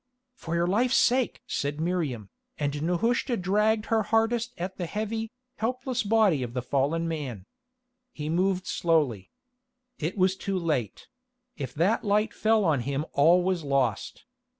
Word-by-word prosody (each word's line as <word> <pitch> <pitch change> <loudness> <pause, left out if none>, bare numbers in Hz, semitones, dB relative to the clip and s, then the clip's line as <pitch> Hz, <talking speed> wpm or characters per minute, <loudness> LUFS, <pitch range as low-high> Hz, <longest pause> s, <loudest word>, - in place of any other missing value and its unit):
"For 170 -8 -5
your 170 0 +2
life's 235 +8 +2
sake!" 255 0 +2
said 145 +1 -3
Miriam, 155 - -2 0.3
and 145 0 -2
Nehushta 230 - +1
dragged 210 +4 +1
her 225 -1 +2
hardest 225 +2 +1
at 185 +2 -5
the 175 - -3
heavy, 220 +3 -3 0.3
helpless 250 +2 -1
body 205 -8 +3
of 120 -1 -5
the 125 - -2
fallen 145 +6 0
man. 135 - -5 0.7
He 150 -1 -6
moved 185 +3 +1
slowly. 145 - 0 0.7
It 165 +6 -3
was 185 0 +3
too 195 0 -3
late; 150 - -2 0.5
if 135 -4 -6
that 180 +9 +2
light 210 0 +1
fell 220 -2 +2
on 155 -5 +2
him 140 +4 -2
all 170 +5 +5
was 185 -2 0
lost. 135 -6 -1
175 Hz, 150 wpm, -27 LUFS, 145-215 Hz, 0.7 s, all